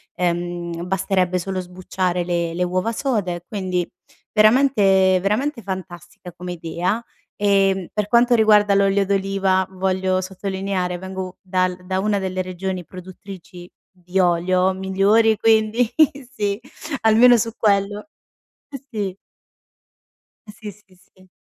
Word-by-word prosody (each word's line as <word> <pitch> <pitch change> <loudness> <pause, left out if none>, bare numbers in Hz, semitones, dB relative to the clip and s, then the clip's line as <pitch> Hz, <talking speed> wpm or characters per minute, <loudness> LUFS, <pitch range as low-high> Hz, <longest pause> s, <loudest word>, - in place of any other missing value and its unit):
ehm, 175 -1 -3
basterebbe 185 -1 0
solo 190 +1 -3
sbucciare 180 0 -3
le 170 -1 -2
le 180 - 0
uova 185 +5 -1
sode, 205 -9 -2
quindi 185 -4 -2 0.5
veramente 210 -5 +4
veramente 230 +7 -1
fantastica 180 -2 -8
come 180 +1 -7
idea. 175 +6 -2 0.3
Ehm, 195 -2 +1
per 210 -1 -1
quanto 240 +3 +4
riguarda 210 -3 +4
l'olio 195 0 +2
d'oliva, 195 -1 0
voglio 185 0 -1
sottolineare: 190 -1 -3
vengo 190 0 -7
dal 185 -1 -1
da 190 0 -1
una 205 +1 0
delle 185 -1 -2
regioni 185 0 -4
produttrici 185 0 -11 0.3
di 180 +2 -2
olio 180 +1 +2
migliori, 195 +4 +2
quindi 225 +1 +2 0.4
sì, 205 -6 -2 0.4
almeno 230 +3 +6
su 230 +1 -1
quello 205 +1 0 0.6
eh 275 -2 -8
sì. 200 -5 -4 1.3
Eh - - -9
sì, 210 0 -9
sì, 195 -2 -23
sì. 185 +1 -25
190 Hz, 120 wpm, -21 LUFS, 180-205 Hz, 1.3 s, almeno